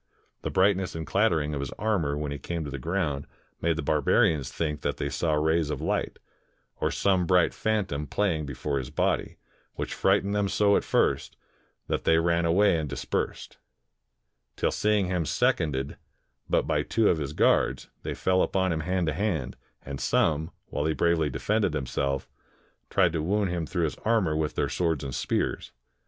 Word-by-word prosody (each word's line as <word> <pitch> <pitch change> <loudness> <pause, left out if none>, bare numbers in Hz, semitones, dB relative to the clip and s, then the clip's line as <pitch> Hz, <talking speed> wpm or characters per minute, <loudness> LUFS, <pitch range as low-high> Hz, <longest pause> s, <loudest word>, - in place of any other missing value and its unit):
The - - -3
brightness 95 -1 +2
and 80 -1 -4
clattering 80 -5 +1
of 70 - -2
his 70 -2 -3
armor 95 -10 0
when 75 -1 -3
he 70 - -4
came 85 0 -4
to 70 - -6
the 70 - -5
ground 75 -2 -2 0.3
made 85 0 +2
the 80 - -3
barbarians 75 -1 +2
think 75 -3 -2
they 70 0 -2
saw 75 +4 0
rays 80 +1 +1
of 75 - -3
Hght, - - -1 0.6
or - - 0
some 95 -3 +1
bright 90 -1 +4
phantom 100 -10 -1
plajing 85 -8 0
before 70 +1 -2
his 65 - -6
body, - - -1 0.4
which - - -4
frightened 100 +1 +2
them 105 -1 +1
so 100 0 +3
at - - +2
first, - - 0 0.5
that - - -2
they 80 - +4
ran 85 +1 +2
away 90 +2 +4
and 75 -2 -3
dispersed; - - -3 1.0
till - - 0
seeing 105 -2 +2
him 90 -2 0
seconded 70 -2 0 0.5
but - - +2
by - - +1
two 110 -1 +1
of 80 - +3
his 70 -1 -4
guards, - - +2
they - - -4
fell 95 0 +2
upon 95 -1 +1
him 80 - -1
hand 90 +2 0
to 80 - 0
hand, 80 - -1 0.3
and 70 0 -6
some, 80 +1 +1 0.2
while 75 - -2
he 80 - 0
bravely 85 -3 +2
defended 105 -4 0
himself, 70 -1 -2 0.6
tried 90 -4 +3
to 80 - -1
wound 100 +3 0
him 85 -3 -2
through 85 +1 -1
his 75 -4 -1
armor 110 -7 +1
^nth 75 -1 -1
their - - +1
swords 80 -5 -1
and 70 -2 -5
spears. - - -1
80 Hz, 180 wpm, -27 LUFS, 75-95 Hz, 1.0 s, bright